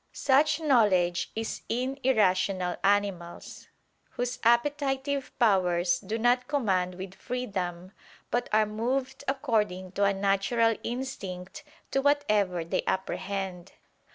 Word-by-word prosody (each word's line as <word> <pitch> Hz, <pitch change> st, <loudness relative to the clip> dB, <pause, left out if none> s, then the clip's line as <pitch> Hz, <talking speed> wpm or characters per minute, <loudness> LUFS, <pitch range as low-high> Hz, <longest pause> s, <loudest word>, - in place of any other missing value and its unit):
Such 290 Hz, +3 st, +3 dB
knowledge 205 Hz, -, +3 dB
is 225 Hz, 0 st, -4 dB
in 255 Hz, +4 st, -2 dB
irrational 190 Hz, -6 st, +2 dB
animals: 195 Hz, -4 st, -1 dB, 0.4 s
whose 245 Hz, +1 st, -3 dB
appetitive 270 Hz, +2 st, +1 dB
powers 180 Hz, -6 st, +2 dB
do 210 Hz, +3 st, -4 dB
not 245 Hz, +2 st, +2 dB
command 190 Hz, -11 st, 0 dB
with 190 Hz, 0 st, -7 dB
freedom, 190 Hz, -5 st, -4 dB, 0.4 s
but 245 Hz, -, 0 dB
are 215 Hz, 0 st, +4 dB
moved 255 Hz, +5 st, -2 dB
according 215 Hz, -9 st, -1 dB
to 200 Hz, +2 st, +1 dB
a 200 Hz, -, +4 dB
natural 200 Hz, +4 st, +2 dB
instinct 235 Hz, -2 st, -6 dB, 0.3 s
to 270 Hz, -, +1 dB
whatever 210 Hz, -, +1 dB
they 170 Hz, -, 0 dB
apprehend. 190 Hz, -1 st, -3 dB
215 Hz, 110 wpm, -28 LUFS, 185-255 Hz, 0.4 s, are